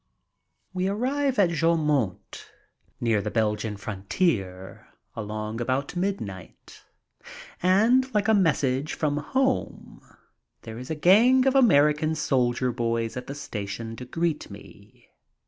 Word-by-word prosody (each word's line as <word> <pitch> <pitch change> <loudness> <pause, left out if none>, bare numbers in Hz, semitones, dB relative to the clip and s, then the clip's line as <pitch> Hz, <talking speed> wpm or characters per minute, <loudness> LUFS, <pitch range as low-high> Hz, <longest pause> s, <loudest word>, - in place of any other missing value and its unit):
We 185 0 -1
arrive 260 +6 -1
at 185 -4 +3
Joumont 150 - 0 0.5
near 115 -3 +1
the - - -3
Belgian 105 -1 -1
frontier 95 - -3 0.3
along 110 +1 -5
about 130 +7 -2
midnight, 175 - -5 0.8
and, 230 +8 +3
like 210 -2 0
a 220 - +4
message 145 -7 +1
from 145 -2 -1
home, 260 - -2 0.6
there 110 +1 -8
is 125 - -9
a 160 - -2
gang 230 - +5
of 265 - +3
American 155 - +4
soldier 125 -4 0
boys 115 -1 -2
at 125 0 -6
the 140 - -6
station 110 -4 -6
to 125 - -8
greet 165 +3 -2
me. - - -15
145 Hz, 120 wpm, -25 LUFS, 115-185 Hz, 0.8 s, gang